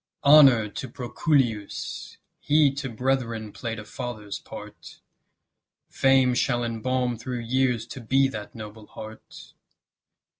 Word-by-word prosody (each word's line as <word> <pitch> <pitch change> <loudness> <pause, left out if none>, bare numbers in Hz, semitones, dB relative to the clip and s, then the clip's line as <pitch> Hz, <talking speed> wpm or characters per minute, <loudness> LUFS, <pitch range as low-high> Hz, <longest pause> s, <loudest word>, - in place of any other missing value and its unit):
Honour 140 -7 +7
to 130 +5 -6
Proculeius! 120 -3 -1 0.2
he 145 -2 +3
To 135 -1 -4
brethren 115 -3 -1
play'd 115 +1 -5
a 105 - -8
father's 105 -3 -6
part; - - -11 0.9
Fame 135 -1 +4
shall 120 -1 +1
embalm 120 +1 -1
through 125 0 -4
years 125 -1 +1
to 130 - -9
be 135 +4 +3
That 105 -5 -7
noble 110 -1 -9
heart. 110 0 -11
120 Hz, 115 wpm, -25 LUFS, 110-135 Hz, 0.9 s, Honour